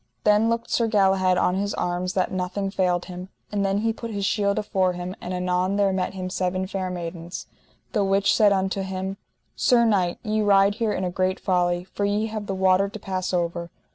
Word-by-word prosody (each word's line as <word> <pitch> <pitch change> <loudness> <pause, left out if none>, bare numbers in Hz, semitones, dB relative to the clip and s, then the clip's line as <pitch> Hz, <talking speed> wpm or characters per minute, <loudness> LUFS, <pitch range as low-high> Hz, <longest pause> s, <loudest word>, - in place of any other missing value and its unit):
Then 210 +2 +4
looked 230 0 -2
Sir 230 - +2
Galahad 190 -3 +3
on 180 - +2
his 200 +1 -1
arms 180 +1 -2
that 185 - 0
nothing 190 +2 -2
failed 180 -2 +1
him, 180 0 -8 0.2
and 205 -1 0
then 195 +1 +1
he 225 0 +1
put 230 +1 -7
his 200 -3 -2
shield 200 0 +1
afore 190 -3 +1
him; 180 +1 -5
and 180 - -5
anon 180 +1 0
there 200 -1 +2
met 185 0 -2
him 185 -1 -4
seven 185 0 -1
fair 190 -1 -3
maidens, 175 0 -6 0.5
the 210 -4 +1
which 195 0 +3
said 210 -2 +5
unto 195 0 0
him: 190 0 -4 0.4
Sir 235 -2 +4
knight, 190 -6 +2
ye 215 0 0
ride 200 -1 +4
here 220 0 -1
in 190 - -2
a 180 - -1
great 185 +1 0
folly, 175 -1 +1
for 190 +2 -5
ye 205 +2 +1
have 215 -2 -5
the 195 - -2
water 190 +1 +3
to 210 - -8
pass 185 -2 -3
over. 170 -1 -1
190 Hz, 210 wpm, -24 LUFS, 180-205 Hz, 0.5 s, said